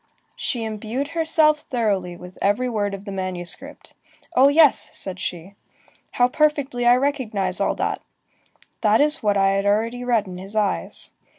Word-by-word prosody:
She 240 -4 -3
imbued 220 +6 -4
herself 320 -2 +3
thoroughly 205 -10 -2
with 180 +1 -12
every 205 +6 +1
word 205 -4 -1
of 195 +1 -12
the 200 - -6
manuscript: 185 +8 -5 0.4
"Oh 260 +2 +6
yes!" 295 0 +5
said 185 -1 -6
she, 180 +2 -5 0.6
"how 245 - +3
perfectly 280 -3 0
I 240 - +7
recognize 225 -9 -1
all - - +1
that! - - -2 0.8
That 215 0 +4
is 300 +1 +4
what 205 -3 +1
I 195 0 +3
had 195 +1 0
already 230 +4 0
read 235 -4 +1
in 180 -1 -8
his 195 +3 -7
eyes." 210 -2 -2
220 Hz, 160 wpm, -22 LUFS, 195-265 Hz, 0.8 s, I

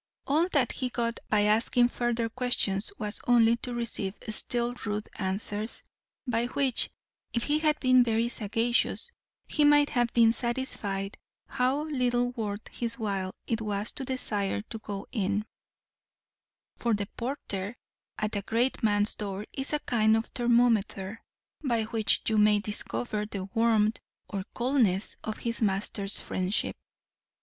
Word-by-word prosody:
All 310 +5 +3
that 280 -8 +2
he 255 - -2
got 235 -1 -2
by 210 -1 +3
asking 225 +3 +3
further 240 -1 0
questions 225 -4 0
was 210 -1 -4
only 235 -1 +6
to 245 - -5
receive 225 -4 -2
still 240 +2 +2
ruder 210 0 -2
answers, 205 +2 -2 0.4
by 240 -1 0
which, 260 -1 +1 0.4
if 235 - 0
he 300 +1 +2
had 305 -1 +2
been 255 -1 +6
very 230 0 +1
sagacious, 235 - 0 0.3
he 300 - +1
might 290 0 +5
have 240 -1 +1
been 230 -1 +6
satisfied 225 -5 -2 0.3
how 270 +2 +1
little 245 -5 +1
worth 215 -3 -4
his 235 +1 -3
while 195 -5 -2
it 230 -1 -1
was 210 0 -2
to 275 - -4
desire 210 -6 -1
to 225 - -5
go 200 -1 -6
in; 210 -2 0 1.3
for 235 -2 +1
the 205 0 -2
porter 230 -4 -4 0.4
at 215 0 -1
a 200 - 0
great 235 +6 0
man's 205 -2 +3
door 200 -1 -4
is 270 0 0
a 300 - +2
kind 220 -2 +3
of 225 - -1
thermometer, 230 -4 +1 0.4
by 235 -5 +1
which 220 -1 +1
you 220 -1 +3
may 210 0 +6
discover 210 +1 -2
the 200 -3 -4
warmth 225 -1 +3 0.3
or 195 -2 -4
coldness 235 -6 +1
of 215 - -4
his 235 0 -3
master's 200 0 0
friendship. 185 +3 -1
225 Hz, 145 wpm, -28 LUFS, 210-245 Hz, 1.3 s, only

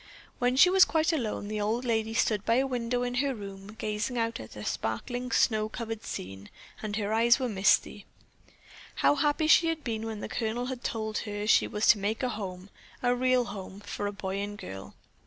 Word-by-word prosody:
When 245 +1 +2
she 360 +7 +7
was 380 0 +7
quite 320 +1 +2
alone, 225 -8 -2
the 210 0 -3
old 225 +5 -1
lady 225 -1 0
stood 210 -3 +1
by 230 - +2
a 265 +2 +3
window 245 -1 -1
in 245 0 -2
her 275 -2 -1
room 200 0 -9
gazing 215 +4 -2
out 230 0 -1
at 110 - -10
a 105 - -7
sparkling 245 - -3
snow 215 -4 +2
covered 225 -1 -5
scene, 95 +2 -7 0.3
and 210 -1 -3
her 215 -1 -1
eyes 235 +2 +5
were 260 - -1
misty. 200 -2 +2 1.0
How - - +7
happy 295 +2 +1
she 330 +1 +6
had 325 -1 -2
been 225 -2 -3
when 220 -2 -5
the - - -4
Colonel 235 +2 -2
had 255 -1 -5
told 220 -1 -2
her 205 -1 -4
she 215 - +4
was 210 +1 -1
to 215 - +7
make 210 +5 -2
a 250 - +1
home, 195 -3 -6 0.3
a 245 0 +3
real 255 0 +2
home, 195 -2 -8
for 205 0 -4
a - - -2
boy 195 -1 -4
and 205 +1 -4
girl. 95 - -9
220 Hz, 210 wpm, -29 LUFS, 205-245 Hz, 1.0 s, she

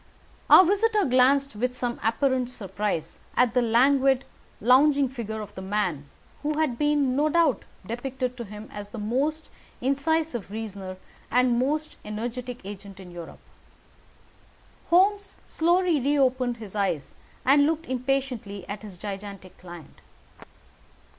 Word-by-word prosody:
Our 370 - +9
visitor 415 +2 +2
glanced 265 0 +3
with 250 +4 -1
some 245 -1 -3
apparent 250 +2 +1
surprise 200 -6 -4 0.2
at 250 -2 +4
the 250 - +3
languid, 265 +3 +3 0.3
lounging 275 +4 +5
figure 220 -4 -5
of 205 -1 -9
the 190 - -8
man 185 -8 -2 0.3
who 300 0 -1
had 300 -7 0
been, 290 -3 +2
no 295 +2 +2
doubt, 315 -8 +2 0.2
depicted 250 +3 -3
to 235 - -5
him 210 +1 -9
as 205 0 -7
the 230 - -8
most 270 +9 -1 0.3
incisive 280 - 0
reasoner 200 -3 -6 0.3
and 245 0 +3
most 305 +4 -1
energetic 240 +2 -5
agent 200 -1 -9
in 180 -2 -11
Europe. 170 -2 -10 1.5
Holmes 400 +3 +3
slowly 345 -2 +2
reopened 260 -3 +1
his 215 -3 -9
eyes 190 -9 -1 0.3
and 285 +2 +5
looked 325 +1 -1
impatiently 255 - -2
at 205 0 -6
his 205 -4 -10
gigantic 195 -1 -7
client. 175 -3 -12
250 Hz, 130 wpm, -26 LUFS, 210-280 Hz, 1.5 s, Our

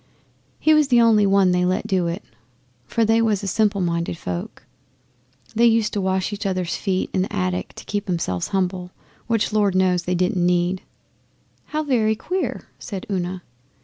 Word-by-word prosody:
He 310 - +4
was 305 -2 +4
the 245 -3 +4
only 220 -3 +5
one 195 -1 +4
they 180 0 +2
let 185 +1 0
do 185 -3 +1
it, 170 +4 -4 0.6
for 230 - +1
they 225 +1 +3
was 215 -3 +1
a - - -3
simple 205 0 +1
minded 170 -1 -1
folk. 90 - -6 0.9
They 235 +1 +4
used 225 -2 +2
to 205 - -1
wash 190 +1 0
each 205 - -5
other's 185 -3 -1
feet 190 -2 -1
up - - -6
in - - +3
the 190 - -2
attic 90 -1 -2
to - - -10
keep 205 -1 -3
'emselves 95 - -1
humble: 185 -1 -1 0.4
which 225 -2 0
Lord 205 -3 +2
knows 185 -1 +3
they 180 +1 -1
didn't 180 0 +1
need.' 180 +1 +1 0.8
'How 310 0 -2
very 225 -6 +2
queer!' 365 - -3
said 195 -5 -6
Una. 180 -1 -2
190 Hz, 180 wpm, -22 LUFS, 180-215 Hz, 0.9 s, only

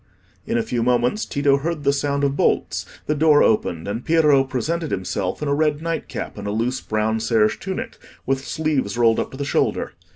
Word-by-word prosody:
In - - 0
a 115 - +1
few 120 - -2
moments 125 - +1
Tito 140 -1 +2
heard 155 +1 -3
the 140 0 +3
sound 140 0 -1
of 140 0 +1
bolts, - - 0 0.2
the 150 - +1
door 150 0 +5
opened, 90 -6 +1
and 110 +4 -3
Piero 150 -4 +4
presented 150 +5 -2
himself 95 +5 -3
in - - -2
a 140 - +1
red 150 0 +1
night 165 0 -3
cap - - -6
and 100 - -5
a - - -1
loose 120 +5 -1
brown 110 +1 -1
serge 110 -1 +2
tunic, 190 0 -5 0.3
with 135 0 0
sleeves 140 -9 -1
rolled 115 -2 +4
up - - -2
to 135 - -10
the 140 - -3
shoulder. - - 0
135 Hz, 205 wpm, -22 LUFS, 115-150 Hz, 0.3 s, door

